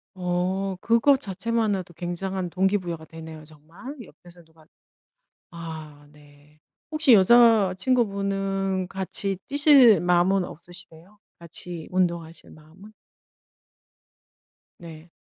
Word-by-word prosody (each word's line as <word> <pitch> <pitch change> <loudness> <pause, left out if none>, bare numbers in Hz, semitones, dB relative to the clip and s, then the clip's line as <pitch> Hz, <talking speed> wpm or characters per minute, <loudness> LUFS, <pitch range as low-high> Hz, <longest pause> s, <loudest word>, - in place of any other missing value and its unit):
어 185 +2 -2
그거 235 +5 +3
자체만으로도 205 -3 -2
굉장한 180 +2 -4
동기부여가 180 -3 -1
되네요 160 -1 -11
정말. 160 - -12
옆에서 175 -2 -18
누가 160 -1 -24 0.9
아 160 -3 -10
네. 150 0 -22 0.3
혹시 310 -4 +4
여자친구분은 195 -3 +2
같이 195 0 -3
뛰실 275 - +5
마음은 180 +2 +2
없으시대요? 175 +3 -13 0.2
같이 170 0 -8
운동하실 170 -3 -2
마음은? 160 +7 -17 1.9
네. 165 -1 -12
185 Hz, 230 characters per minute, -24 LUFS, 165-200 Hz, 1.9 s, 뛰실